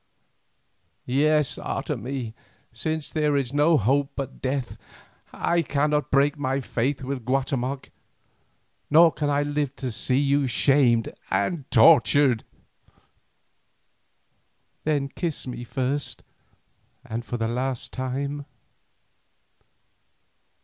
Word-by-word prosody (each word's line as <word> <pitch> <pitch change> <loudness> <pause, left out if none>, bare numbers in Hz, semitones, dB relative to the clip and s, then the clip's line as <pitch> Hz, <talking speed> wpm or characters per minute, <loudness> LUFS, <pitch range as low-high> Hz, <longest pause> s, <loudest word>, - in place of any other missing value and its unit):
"Yes, 150 +2 +2
Otomie, 130 -3 -4 0.4
since 155 +6 -3
there 150 -2 +1
is 135 -2 -2
no 150 +3 +4
hope 135 +5 +2
but 135 -1 -6
death. 130 -1 -3 0.5
I 170 0 +1
cannot 150 -1 0
break 140 +2 +2
my 135 -1 0
faith 130 +2 -2
with 130 -1 -4
Guatemoc, 135 +1 -2 1.0
nor 165 +2 +7
can 150 -2 -2
I 145 0 +2
live 145 -2 -2
to 130 -3 -4
see 125 +3 0
you 140 0 +2
shamed 125 -2 +3 0.2
and 130 - -1
tortured." 120 +2 +5 2.4
"Then 145 -3 +1
kiss 165 +2 -4
me 125 -2 -6
first 130 +4 -2 0.8
and 115 +2 -4
for 120 - -4
the 115 -1 -1
last 125 +1 -3
time." 140 +2 -3
135 Hz, 100 wpm, -25 LUFS, 125-145 Hz, 2.4 s, nor